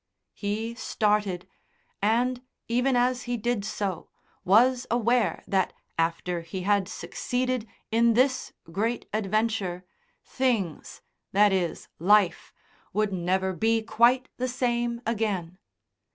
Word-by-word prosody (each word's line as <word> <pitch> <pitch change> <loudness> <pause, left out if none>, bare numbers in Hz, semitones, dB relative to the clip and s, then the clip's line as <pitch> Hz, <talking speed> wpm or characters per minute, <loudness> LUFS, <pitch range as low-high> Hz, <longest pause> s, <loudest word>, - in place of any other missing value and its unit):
He 220 +3 -3
started, 210 -6 0 0.5
and, 240 +4 +1 0.3
even 250 +3 +2
as 250 +1 +1
he 245 - 0
did 235 -1 -1
so, 200 -4 -3 0.3
was 245 +6 +4
aware 240 0 +1
that, 190 -2 +1 0.2
after 170 +1 -1
he 165 +3 -6
had 200 -1 +2
succeeded 245 +6 -2 0.2
in 230 0 +4
this 260 +2 +2 0.2
great 225 +7 -1
adventure, 210 -3 -1 0.4
things 230 - -2 0.3
that 205 0 +5
is, 175 -4 -1
life 190 0 +3 0.4
would 210 0 +1
never 190 +1 0
be 225 +3 +1
quite 245 +3 +3
the 255 - -1
same 240 -1 -1
again. 200 -6 -2
215 Hz, 110 wpm, -27 LUFS, 190-240 Hz, 0.5 s, that